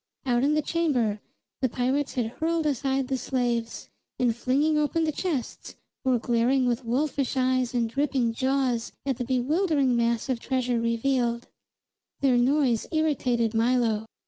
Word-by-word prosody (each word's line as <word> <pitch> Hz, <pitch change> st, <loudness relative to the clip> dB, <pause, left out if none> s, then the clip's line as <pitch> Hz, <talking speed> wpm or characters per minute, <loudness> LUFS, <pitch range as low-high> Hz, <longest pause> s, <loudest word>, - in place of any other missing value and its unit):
Out 245 Hz, -1 st, +2 dB
in 295 Hz, +2 st, +3 dB
the 305 Hz, -, +1 dB
chamber 255 Hz, -12 st, 0 dB, 0.4 s
the 260 Hz, -, +2 dB
pirates 260 Hz, +4 st, -1 dB
had 245 Hz, -3 st, 0 dB
hurled 320 Hz, +7 st, -1 dB
aside 270 Hz, -2 st, 0 dB
the 265 Hz, -1 st, -1 dB
slaves, 240 Hz, -3 st, -2 dB, 0.3 s
and, 240 Hz, -3 st, +1 dB
flinging 280 Hz, +6 st, +1 dB
open 300 Hz, +2 st, +1 dB
the 310 Hz, -, +1 dB
chests, 300 Hz, -6 st, -4 dB, 0.3 s
were 255 Hz, -2 st, +2 dB
glaring 240 Hz, +3 st, +1 dB
with 245 Hz, -1 st, 0 dB
wolfish 270 Hz, +3 st, -1 dB
eyes 255 Hz, -1 st, +1 dB
and 235 Hz, -1 st, +1 dB
dripping 260 Hz, -2 st, 0 dB
jaws 260 Hz, -2 st, 0 dB
at 270 Hz, -3 st, -1 dB
the 250 Hz, -, -2 dB
bewildering 270 Hz, +2 st, +1 dB
mass 235 Hz, 0 st, 0 dB
of 255 Hz, -3 st, -1 dB
treasure 250 Hz, -1 st, -1 dB
revealed. 235 Hz, +1 st, 0 dB, 0.7 s
Their 265 Hz, -3 st, +3 dB
noise 255 Hz, -2 st, +2 dB
irritated 255 Hz, -8 st, +1 dB
Milo. 225 Hz, -2 st, +1 dB
255 Hz, 145 wpm, -26 LUFS, 235-280 Hz, 0.7 s, in